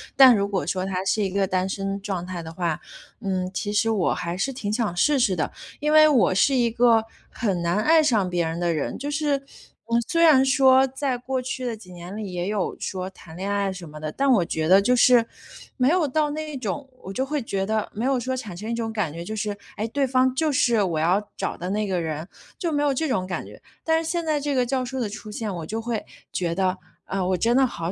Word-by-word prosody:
但 260 -3 +9
如 200 -1 +1
果 200 -2 -2
说 185 -1 -1
他 190 -1 -2
是 215 - +1
一 195 - 0
个 195 +1 0
单 185 0 0
身 195 0 -3
状 195 -3 -3
态 180 -1 -5
的 160 - -8
话， 170 -2 -1 0.4
嗯， 185 -3 -1
其 205 +2 -2
实 215 +2 +2
我 210 -5 +1
还 175 0 -4
是 270 +8 -1
挺 225 -5 -4
想 215 -5 -1
试 290 +11 +3
试 205 -7 +2
的。 160 - -1 0.3
因 300 +1 0
为 310 0 +8
我 230 -11 +3
是 275 +8 +4
一 240 -2 +3
个 230 -1 +4 0.2
很 195 -7 -1
难 170 +2 0
爱 320 +8 +5
上 215 -10 +2
别 175 -1 0
人 165 +1 -3
的 175 -1 +1
人， 155 -3 -2
就 285 - -4
是 290 -2 0 0.7
虽 335 - +1
然 305 -6 +7
说 265 -1 +5
在 265 -1 -2
过 260 +1 -3
去 255 0 -4
的 235 -2 -2
几 190 -4 -14
年 175 +2 -8
里， 210 -3 -5
也 175 0 -3
有 205 -2 -1
说 185 -1 -4
谈 175 -3 -14
恋 190 +3 -4
爱 200 -1 0
什 180 -2 -9
么 150 0 -10
的， 155 0 -4
但 275 - 0
我 205 -9 +4
觉 160 -1 -2
得 190 +3 +7
就 250 +5 +3
是， 245 -1 +5 0.5
没 255 -1 +3
有 340 -1 +2
到 300 +2 +1
那 310 +1 -4
一 - - -6
种， 260 +4 -4 0.2
我 190 - -7
就 260 - 0
会 295 +1 -2
觉 195 -4 -2
得， 215 +1 -1
没 220 - -4
有 265 -1 +2
说 260 +2 -2
产 210 -7 -6
生 210 +5 -6
一 235 - -1
种 230 -1 -2
感 205 -9 -1
觉， 170 +1 -6
就 215 +5 -5
是， 210 -1 -2 0.2
诶， 215 +2 -1
对 280 +4 +1
方 255 0 +3
就 310 +2 +1
是 235 -5 +3
我 170 -5 -1
要 190 +6 +1
找 - - -2
的 180 - -4
那 210 +1 0
个 185 -2 0
人， 160 0 -4 0.3
就 340 -3 -2
没 290 -1 +1
有 290 - +3
这 315 +5 -1
种 220 -9 0
感 180 - -4
觉。 - - -13 0.2
但 320 0 +2
是 320 - -4
现 340 -1 -1
在 305 -2 +1
这 290 0 -2
个 250 -1 +2
教 260 +1 -1
授 260 +2 -4
的 235 - 0
出 215 +1 -8
现， 210 -1 -4
我 165 -2 -5
就 220 +7 -3
会 230 -2 -3 0.3
觉 170 -2 -1
得， 185 0 +1 0.3
啊， 195 -1 -2
我 185 0 +1
真 230 +6 +2
的 265 0 +5
好 170 -7 -4
215 Hz, 275 characters per minute, -24 LUFS, 185-260 Hz, 0.7 s, 但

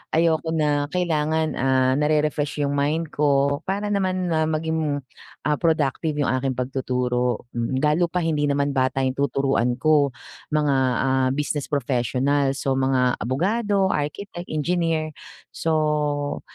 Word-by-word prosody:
ayoko 160 0 +2
na 145 -2 +1
kailangan, 160 -3 0
ah, 130 0 +3
nare-refresh 150 -1 0
yung 140 - 0
mind 150 +3 0
ko 140 -1 +2
para 205 +2 -1
naman, 185 -3 0
ah, 160 -1 +2
maging, 155 -2 -1 0.4
ah, 150 0 0
productive 160 -2 0
yung 130 - +1
aking 130 0 -1
pagtuturo, 125 -1 -1
mm. 120 +3 -2
Lalo 155 +4 +3
pa 180 +1 -2
hindi 150 -3 +1
naman 140 0 +1
bata 130 0 0
yung 130 - +1
tuturuan 135 -3 +1
ko, 145 -1 +2 0.4
mga, 150 -2 +2 0.3
ah, 130 -1 +2
business 145 0 -2
professionals. 135 +1 0
So, 135 -1 +1
mga 130 -2 +1
abogado, 195 - +1
architect, 175 +5 -4
engineer. 160 0 -1 0.4
So, 150 -2 0
145 Hz, 130 wpm, -23 LUFS, 135-160 Hz, 0.4 s, ah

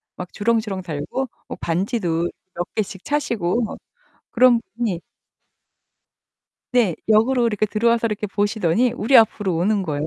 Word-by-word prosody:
막 180 0 -7
주렁주렁 215 -3 0
달고 175 - -4 0.2
뭐 - - -7
반지도 175 -2 -1 0.3
몇 175 - -2
개씩 200 -3 -3
차시고 235 -8 0
뭐 220 - -5 0.5
그런 245 -1 +5 0.2
분이 220 -8 -1 1.7
네 225 -9 +3
역으로 235 +3 +4
이렇게 215 -2 0
들어와서 230 +2 +1
이렇게 210 -1 -2
보시더니 205 +2 +1
우리 245 +2 +3
앞으로 205 -5 +3
오는 200 +4 +1
거예요. 150 -4 -2
210 Hz, 300 characters per minute, -21 LUFS, 180-235 Hz, 1.7 s, 그런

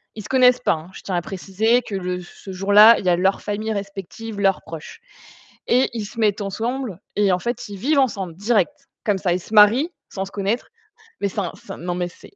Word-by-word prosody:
ils 215 - -7
se 210 - -11
connaissent 250 -1 +5
pas, - - +2
hein. 160 +2 -7
Je - - -11
tiens 190 - -3
à 175 - +1
préciser 200 +6 0
que 210 - -6
le 180 -1 -3
ce 180 +2 -11
jour-là, 205 +4 +7
il - - -8
y - - +3
a 175 - +4
leur 190 +3 +1
famille 215 +1 -3
respective, 200 +2 -6
leurs 195 -1 +2
proches. 160 -1 -9 0.7
Et 250 +2 +3
ils 225 -2 -3
se 230 - -10
mettent 210 -1 +2
ensemble 225 +1 -3 0.2
et 205 -1 +3
en 180 - +2
fait, 235 +2 -4
ils 200 - -7
vivent 280 +9 +2
ensemble 195 -10 -1
direct. 220 - 0 0.2
Comme 205 -3 +2
ça, 185 -2 0
ils 180 - -1
se 215 - -12
marient 225 - +6 0.2
sans 190 -1 -4
se 195 - -12
connaître, 205 +4 -2 0.5
mais - - +1
c'est 205 - -3
un 180 -4 -2
c'est - - -11
un - - -12
non 175 +1 -3
mais 180 -1 -1
c'est 175 - -16
205 Hz, 240 wpm, -22 LUFS, 185-225 Hz, 0.7 s, jour-là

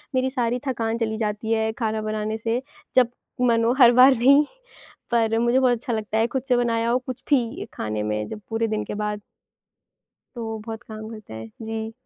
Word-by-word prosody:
मेरी 260 0 +2
सारी 245 -2 -1
थकान 230 -3 -1
चली 220 -2 -1
जाती 215 0 -2
है 220 0 +1
खाना 220 -1 -1
बनाने 215 0 -2
से 230 +2 -1 0.3
जब 250 -2 +5 0.3
मन 230 -2 +3
हो, 235 +2 +3
हर 240 -1 +9
बार 255 +2 +8
नहीं। 280 +5 +6 0.7
पर 225 -1 +2
मुझे 240 +2 +3
बहुत 250 -2 +3
अच्छा 235 +1 -4
लगता 220 0 -2
है 225 +1 +3
खुद 265 +1 -3
से 250 - +5
बनाया 230 -1 +1
हो 245 - +3
कुछ 255 -1 -7
भी 245 -5 +1
खाने 105 -1 -3
में 105 0 -2
जब 210 - -7
पूरे 225 0 0
दिन 215 0 -1
के - - -5
बाद। 210 0 -3 1.1
तो 235 -1 -5
वो 225 0 -4
बहुत 225 -1 -6
काम 215 0 -7
करता 215 - -10
है। 110 0 -7 0.2
जी। 220 0 -4
225 Hz, 205 wpm, -24 LUFS, 215-240 Hz, 1.1 s, हर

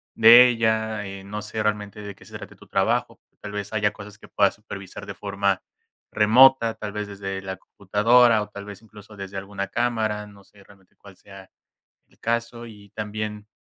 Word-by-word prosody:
de 120 +2 +9
ella, 110 -2 0
eh, 95 0 -8
no 105 +2 -6
sé 110 +1 -4
realmente 105 -1 -2
de 100 -1 -7
se - - -13
trate - - -11
tu - - -17
trabajo, - - 0 0.2
tal 105 - -8
vez 105 0 -5
haya 105 -1 +1
cosas 105 0 -11
que - - -16
puedas 100 -1 +2
supervisar 100 -1 -9
de 100 - -7
forma 100 -1 -1 0.5
remota, 115 +2 +5
tal 105 -2 -7
vez 105 0 -4
desde 95 -1 -6
la 95 0 -5
computadora, 110 +4 +3
o 105 - -6
tal 100 -1 -9
vez, 100 0 -10
incluso 105 -1 -15
desde 100 0 -7
alguna 100 0 -5
cámara, 110 -2 -1
no 100 -1 -17
sé 100 0 -21
realmente 95 -1 -22
cuál 100 -1 -16
sea 95 0 -14 0.6
el - - -30
caso. 115 0 -3
Y 105 -2 -15
también, 105 0 -5
105 Hz, 185 wpm, -24 LUFS, 100-110 Hz, 0.6 s, de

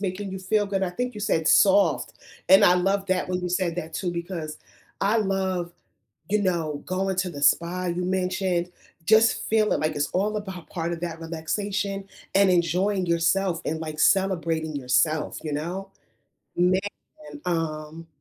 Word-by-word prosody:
making 195 0 -3
you 190 - -5
feel 205 +2 +1
good, 195 -1 -1
I 185 - 0
think 245 +6 -3
you 210 - -7
said 160 -6 0
soft, 200 +4 +4 0.3
and 190 - +8
I 180 - +6
love 195 +2 +1
that 185 -1 0
when 180 0 -1
you 180 - -3
said 175 -1 -1
that 165 -2 -5
too 180 +1 -2
because 170 -3 -5 0.4
I 205 +3 +2
love, 190 -4 -1 0.6
you 210 +1 +1
know, 165 -6 -1
going 190 +1 -1
to 185 -1 0
the 145 -4 -8
spa, 175 +4 +2
you 175 +1 -2
mentioned, 185 -1 -1 0.4
just 220 +4 +4
feeling 215 -1 +2
like 155 0 0
it's 145 - 0
all 205 +4 0
about 190 -5 -7
part 170 -1 -3
of 170 - -5
that 165 -1 -5
relaxation 195 +5 -3 0.3
and 195 0 +5
enjoying 185 +3 +1
yourself 170 +1 +1
and, 160 - -1
like, 155 -1 -5
celebrating 165 -5 +2
yourself, 140 +4 +1
you 155 - -4
know. 180 +6 -4 0.7
Man, 180 +2 +3 0.7
um, 160 -1 -3
180 Hz, 165 wpm, -25 LUFS, 165-195 Hz, 0.7 s, and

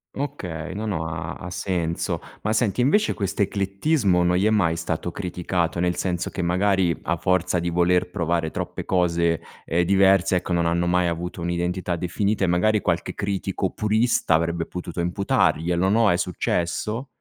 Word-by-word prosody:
Okay. 90 - -4
No, 110 +2 -4
no. 85 -6 -2
Ha 80 0 -5
ha 90 - -7
senso. 85 -2 -2 0.2
Ma 105 - -1
senti, 110 +1 +1
invece 200 - +3
quest'eclettismo 100 - +1
non 90 0 +2
gli 100 - +2
è - - +4
mai 90 -7 +2
stato 85 +1 -3
criticato? 90 -2 -2
Nel 90 0 +1
senso 90 -2 -2
che - - -4
magari, 90 0 +2
a 85 - 0
forza 90 0 +1
di 85 - -1
voler 90 +1 +2
provare 85 -2 -1
troppe - - -5
cose, 85 -2 +1 0.3
ehm, 85 +2 +1
diverse 95 -1 +4
ecco, 90 - -4
non 85 -1 +1
hanno 85 +1 +1
mai 90 0 +2
avuto 85 +1 -4
un'identità 85 +1 -1
definita. 100 +4 -1
E 95 - +3
magari, 100 +5 +2
qualche 85 -2 -1
critico 100 -1 -2
purista, 110 -3 +1
avrebbe 85 +1 +1
potuto 90 0 -6
imputarglielo, 90 -1 +1
no, 110 +1 +4
è 90 - +3
successo? 90 - -2
90 Hz, 165 wpm, -23 LUFS, 85-100 Hz, 0.3 s, è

